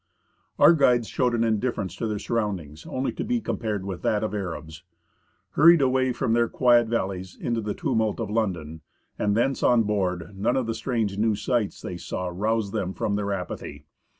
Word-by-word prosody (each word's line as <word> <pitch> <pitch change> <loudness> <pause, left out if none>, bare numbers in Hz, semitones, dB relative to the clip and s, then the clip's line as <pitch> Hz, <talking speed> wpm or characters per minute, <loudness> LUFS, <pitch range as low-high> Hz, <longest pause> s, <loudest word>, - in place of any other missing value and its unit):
Our - - +7
guides 125 -7 +3
showed 125 -2 +1
an 115 - +1
indifference 110 -4 -1
to 115 - -2
their 105 -1 -2
surroundings 95 -10 -3
only 130 +1 -2
to - - -4
be 245 -1 0
compared 105 - -3
with 95 -3 -5
that 105 0 +1
of 110 - -2
Arabs. 80 -5 -5 0.7
Hurried 170 +2 +7
away 130 -1 +2
from 115 -2 0
their 120 0 +2
quiet 120 -2 +4
valleys 95 -5 -3
into 115 -1 -1
the 105 -1 -3
tumult 110 0 0
of 110 -3 -3
London, 85 -8 -2 0.4
and 105 0 +1
thence 135 +3 +1
on 120 -2 +4
board, 95 -4 -1
none 95 +2 0
of 130 - 0
the 115 - -2
strange 110 -4 -2
new 110 0 +2
sights 115 0 -1
they 90 - -5
saw 90 +1 -4
roused 105 +2 -1
them 95 -4 -2
from 100 - -1
their 100 -1 -1
apathy. 95 -2 -5
110 Hz, 185 wpm, -25 LUFS, 95-120 Hz, 0.7 s, Our